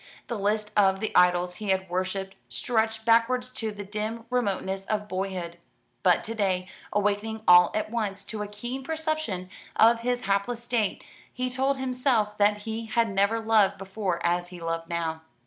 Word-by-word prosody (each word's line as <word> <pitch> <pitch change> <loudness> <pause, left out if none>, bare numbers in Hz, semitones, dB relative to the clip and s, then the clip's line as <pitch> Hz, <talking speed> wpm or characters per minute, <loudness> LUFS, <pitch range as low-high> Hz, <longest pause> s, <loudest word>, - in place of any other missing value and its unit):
The 235 - -4
list 210 +1 0
of 195 -2 +4
the 220 - -3
idols 180 0 +4
he 210 -2 -5
had 190 0 +1
worshipped 185 +2 -2 0.2
stretched 220 -2 -1
backwards 240 +2 +3
to 225 -4 -3
the 205 -1 -7
dim 215 +3 -4
remoteness 195 -5 -1
of 210 0 -2
boyhood. 185 -3 -4 0.4
But 180 -2 +4
to 225 - -4
day, 190 -4 0 0.2
awakening 210 +2 0
all 180 -1 +8
at 215 0 -1
once 205 -4 -2
to 215 -1 -5
a 210 - -3
keen 240 +6 -6
perception 310 - -2 0.3
of 230 +1 +6
his 245 +1 -1
hapless 200 +5 -1
state, 235 -4 -1 0.3
he 255 0 -3
told 265 +2 +1
himself 250 -5 +1
that 205 0 +3
he 225 0 -4
had 230 0 +2
never 200 +4 +2
loved 215 -3 +3
before 195 -2 -3
as 175 +1 +1
he 180 -1 -10
loved 165 0 -3
now. 165 -1 -2
210 Hz, 170 wpm, -27 LUFS, 190-230 Hz, 0.4 s, all